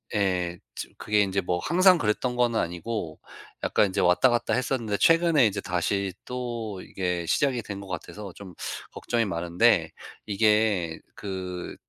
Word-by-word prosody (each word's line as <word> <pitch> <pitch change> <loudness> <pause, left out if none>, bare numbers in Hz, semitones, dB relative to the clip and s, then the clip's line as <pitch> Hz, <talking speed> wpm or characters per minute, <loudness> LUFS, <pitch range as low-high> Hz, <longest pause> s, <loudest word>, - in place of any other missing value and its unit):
예. 90 -4 0 0.2
지금 - - -7
그게 105 -1 +2
이제 100 0 +1
뭐 90 -1 -1
항상 185 - +5
그랬던 125 +3 0
거는 120 -2 +2
아니고 85 -1 -4 0.4
약간 100 - +3
이제 - - 0
왔다갔다 120 +7 +3
했었는데 120 -5 0
최근에 165 -4 +5
이제 100 -1 0
다시 95 +1 -1
또 120 -6 -4
이게 90 -2 -3
시작이 135 -5 +1
된 100 -2 -7
것 100 - -9
같아서 95 +2 -7
좀 95 -2 -11 0.4
걱정이 115 -1 -1
많은데 85 0 +2 0.3
이게 105 -5 +2 0.2
그 95 -3 -5
100 Hz, 295 characters per minute, -26 LUFS, 90-120 Hz, 0.4 s, 항상